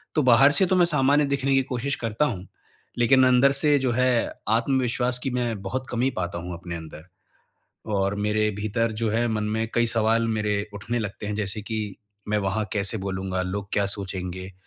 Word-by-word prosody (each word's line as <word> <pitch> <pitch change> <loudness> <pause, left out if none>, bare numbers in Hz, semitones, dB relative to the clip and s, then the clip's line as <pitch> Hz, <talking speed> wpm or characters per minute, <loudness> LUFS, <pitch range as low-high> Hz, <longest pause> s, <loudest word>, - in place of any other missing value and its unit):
तो 155 - +3
बाहर 130 +3 +6
से 150 +6 +4
तो 185 - +1
मैं 180 -1 +5
सामान्य 145 -2 +3
दिखने 140 -1 0
की 135 - +4
कोशिश 130 +2 -3
करता 115 +4 -1
हूँ, 100 -8 -4 0.5
लेकिन 130 +2 +5
अंदर 130 +2 +5
से 145 +1 +3
जो 130 -2 0
है, 125 -1 +1 0.2
आत्मविश्वास 125 +1 +1
की 135 - -1
मैं 120 -4 -2
बहुत 130 +7 -4
कमी 125 +2 0
पाता 85 -1 -3
हूँ 90 +1 -6
अपने 85 0 -7
अंदर, 80 -1 -9 0.8
और 100 -2 0
मेरे 105 +1 0
भीतर 110 +2 -1
जो 110 - +1
है, 115 +2 +1
मन 110 -2 -1
में 110 +1 -1
कई 120 0 +3
सवाल 115 0 +2
मेरे 105 -2 -1
उठने 110 +4 -3
लगते 105 -2 -5
हैं। 105 - -3
जैसे 105 0 -3
कि 105 -2 -4 0.3
मैं 105 0 +1
वहाँ 100 +2 -1
कैसे 100 +1 +1
बोलूँगा, 95 -1 -3
लोग 100 +2 -4
क्या 100 - +2
सोचेंगे? 95 -2 -5
110 Hz, 190 wpm, -24 LUFS, 100-125 Hz, 0.8 s, बाहर